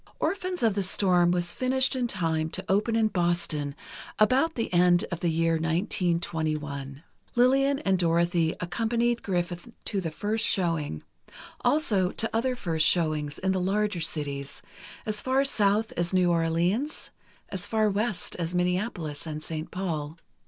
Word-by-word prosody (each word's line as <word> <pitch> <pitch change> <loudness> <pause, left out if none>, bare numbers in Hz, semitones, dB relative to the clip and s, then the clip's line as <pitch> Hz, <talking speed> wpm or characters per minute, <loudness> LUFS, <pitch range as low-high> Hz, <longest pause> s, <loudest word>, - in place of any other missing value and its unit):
"Orphans 370 -4 -1
of 225 -3 +4
the 200 - 0
Storm" 180 -2 +3
was 175 -1 0
finished 260 +1 +2
in 250 -2 0
time 160 -6 -1
to - - -4
open 210 +4 +1
in 220 -1 +3
Boston 170 -6 -1 0.4
about 260 +9 +3
the 230 -5 -3
end 175 0 +4
of 175 - -3
the 175 - 0
year 165 0 +2
1921. 160 -4 -2 0.3
Lillian 270 +3 +4
and 195 -10 +1
Dorothy 170 -1 +2
accompanied 235 +6 0
Griffith 175 -1 -2 0.2
to 200 -3 -1
the 165 - -2
first 215 +7 -2
showing; 165 - 0 0.6
also, 205 -12 +2
to 225 - 0
other 250 +3 +1
first 165 -8 +1
showings 155 -4 0
in 190 0 0
the 190 -1 0
larger 200 -1 0
cities—as 150 +8 -5
far 265 +2 +2
South 215 -3 +2
as 175 +2 -1
New 180 -1 +4
Orleans, 170 - 0 0.4
as 185 -2 -3
far 220 -1 +2
West 205 -2 -1
as 170 0 -3
Minneapolis 180 -4 -1
and 155 0 -5
St. 155 0 -5
Paul. 160 -4 -4
180 Hz, 145 wpm, -27 LUFS, 165-215 Hz, 0.6 s, of